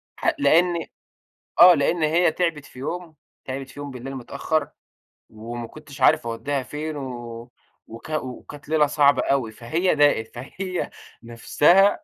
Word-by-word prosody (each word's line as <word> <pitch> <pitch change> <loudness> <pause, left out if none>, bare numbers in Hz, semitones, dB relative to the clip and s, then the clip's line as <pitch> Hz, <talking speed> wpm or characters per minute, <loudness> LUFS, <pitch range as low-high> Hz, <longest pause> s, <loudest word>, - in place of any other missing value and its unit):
حا - - 0
لإن 170 - +3 0.7
آه. 180 0 +10
لإن 155 +3 +1
هي 165 +2 +3
تعبت 165 -4 -2
في 125 - -14
يوم، 165 +3 -5 0.3
تعبت 135 0 -5
في - - -12
يوم 145 -1 -6
بالليل 130 +2 -7
متأخّر 155 +5 -2 0.6
وما 115 +2 -7
كنتش 145 0 -13
عارف 120 - +4
أودّيها 135 +4 -2
فين 150 +2 -5
و 120 -3 -7 0.4
وكا 135 +7 -5
وكانت 140 +2 -9
ليلة 155 -2 +3
صعبة 145 -1 +3
أوي. 130 -5 0
فهي 160 +12 0
ضاقت، 145 -6 +3
فهي 180 +9 -5 0.3
نفسها 150 +11 +4
145 Hz, 140 wpm, -23 LUFS, 125-160 Hz, 0.7 s, آه